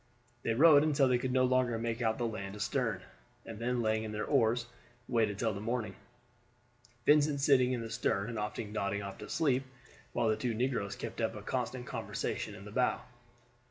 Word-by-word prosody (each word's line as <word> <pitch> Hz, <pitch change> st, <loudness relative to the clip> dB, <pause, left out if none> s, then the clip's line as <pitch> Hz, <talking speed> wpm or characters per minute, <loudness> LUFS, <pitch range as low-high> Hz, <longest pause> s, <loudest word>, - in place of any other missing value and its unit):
They 115 Hz, -, 0 dB
rowed 150 Hz, +2 st, +7 dB
until 145 Hz, -3 st, +3 dB
they 125 Hz, -1 st, +3 dB
could 130 Hz, +1 st, -2 dB
no 130 Hz, 0 st, +3 dB
longer 125 Hz, -2 st, +2 dB
make 115 Hz, +1 st, -2 dB
out 110 Hz, -1 st, +1 dB
the 120 Hz, -, -1 dB
land 105 Hz, -3 st, -4 dB
astern, 105 Hz, -2 st, -1 dB, 0.4 s
and 110 Hz, -2 st, -8 dB
then 120 Hz, 0 st, 0 dB
laying 110 Hz, 0 st, +1 dB
in 110 Hz, -, -5 dB
their 105 Hz, 0 st, -3 dB
oars 120 Hz, -3 st, +2 dB, 0.4 s
waited 110 Hz, -5 st, +1 dB
till 110 Hz, 0 st, 0 dB
the 100 Hz, -, -6 dB
morning, 115 Hz, 0 st, -2 dB, 1.1 s
Vincent 150 Hz, -1 st, +4 dB
sitting 135 Hz, -3 st, +4 dB
in 125 Hz, -2 st, -1 dB
the 115 Hz, -, -5 dB
stern 100 Hz, +1 st, 0 dB
and 115 Hz, -2 st, -4 dB
often 105 Hz, 0 st, -4 dB
nodding 100 Hz, -1 st, -1 dB
off 100 Hz, -1 st, -7 dB
to -, -, -8 dB
sleep, 140 Hz, -5 st, +2 dB, 0.5 s
while -, -, +1 dB
the 110 Hz, -, +3 dB
two 115 Hz, +1 st, -2 dB
negroes 120 Hz, -4 st, -1 dB
kept -, -, -6 dB
up -, -, 0 dB
a -, -, -8 dB
constant -, -, -3 dB
conversation -, -, -4 dB
in 100 Hz, -, -11 dB
the 105 Hz, -, -9 dB
bow. 125 Hz, +3 st, +1 dB
115 Hz, 195 wpm, -32 LUFS, 110-130 Hz, 1.1 s, rowed